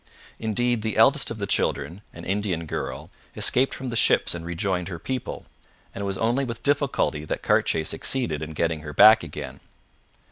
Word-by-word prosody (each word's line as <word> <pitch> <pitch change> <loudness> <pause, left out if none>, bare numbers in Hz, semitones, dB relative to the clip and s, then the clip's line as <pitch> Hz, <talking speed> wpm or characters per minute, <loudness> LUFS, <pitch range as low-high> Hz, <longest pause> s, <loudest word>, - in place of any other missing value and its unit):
Indeed, 115 +1 0
the 110 -1 -3
eldest 135 +5 +5
of 115 - -5
the 100 - -3
children, 70 +1 -1
an 85 - -11
Indian 95 -4 -2
girl, - - -5 0.2
escaped 130 +2 +2
from 130 -1 -6
the 115 - -4
ships - - +3
and 85 -1 -6
rejoined 90 +1 -2
her 90 -3 -5
people, 130 +8 -5 0.5
and 100 - -6
it - - -2
was 95 -1 -3
only 120 +5 +1
with 115 -3 -6
difficulty 140 - 0
that 75 - -4
Cartier 80 - +2
succeeded 80 - -1
in 80 0 -6
getting 80 0 -1
her 75 -1 -8
back 110 +6 +8
again. 70 -4 -8
100 Hz, 180 wpm, -24 LUFS, 80-115 Hz, 0.5 s, back